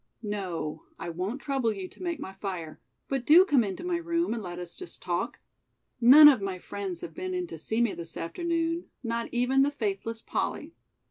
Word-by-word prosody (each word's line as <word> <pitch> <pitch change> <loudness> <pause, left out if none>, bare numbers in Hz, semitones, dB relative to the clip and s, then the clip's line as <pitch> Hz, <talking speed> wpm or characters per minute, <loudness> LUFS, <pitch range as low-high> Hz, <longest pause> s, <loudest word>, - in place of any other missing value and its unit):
"No, 180 -7 -4
I - - -5
won't 190 +11 -3
trouble 270 -5 +1
you 195 -3 -5
to - - -17
make 340 -4 -2
my 190 -9 -7
fire, 185 -5 -6 0.3
but 270 -2 -1
do 335 +8 +8
come 285 -9 +4
into 195 - -5
my 355 -1 0
room 335 -4 0
and 235 - -3
let 175 -3 -6
us 175 -1 -7
just 365 - -8
talk. - - -2 0.6
None 280 +6 +10
of 270 -8 +6
my 195 -2 -3
friends 190 -1 -6
have 165 - -7
been 370 0 -4
in 360 0 -1
to 350 - -9
see 220 +2 -1
me 235 -4 +2
this 165 -1 -6
afternoon, 335 - -1 0.2
not 230 0 -2
even 250 +3 +2
the 280 - +4
faithless 225 -3 -3
Polly! - - -3
230 Hz, 200 wpm, -28 LUFS, 190-305 Hz, 0.6 s, None